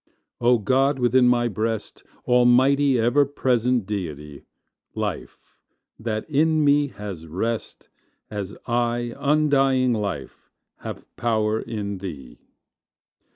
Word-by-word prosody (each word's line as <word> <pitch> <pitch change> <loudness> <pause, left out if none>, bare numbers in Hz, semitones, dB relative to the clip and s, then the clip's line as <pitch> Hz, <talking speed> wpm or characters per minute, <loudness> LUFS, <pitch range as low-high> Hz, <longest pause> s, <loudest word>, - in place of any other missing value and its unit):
O 120 0 +4
God 135 +6 +2
within 125 0 +3
my 120 -1 +3
breast, 110 +1 -3 0.2
Almighty, 130 +3 +4
ever 120 +6 +3
present 125 -4 0
Deity! 75 -8 -6 0.5
Life - - -4 0.6
that 110 -1 -3
in 155 +1 +2
me 145 0 +4
has 100 - -8
rest, 110 +8 -4 0.4
As 100 -2 -5
I 120 0 -1
undying 135 -4 +2
Life 100 - -5 0.3
have - - -8
power 110 -2 0
in 100 -3 -5
Thee! 75 -10 -8
120 Hz, 105 wpm, -23 LUFS, 105-130 Hz, 0.6 s, O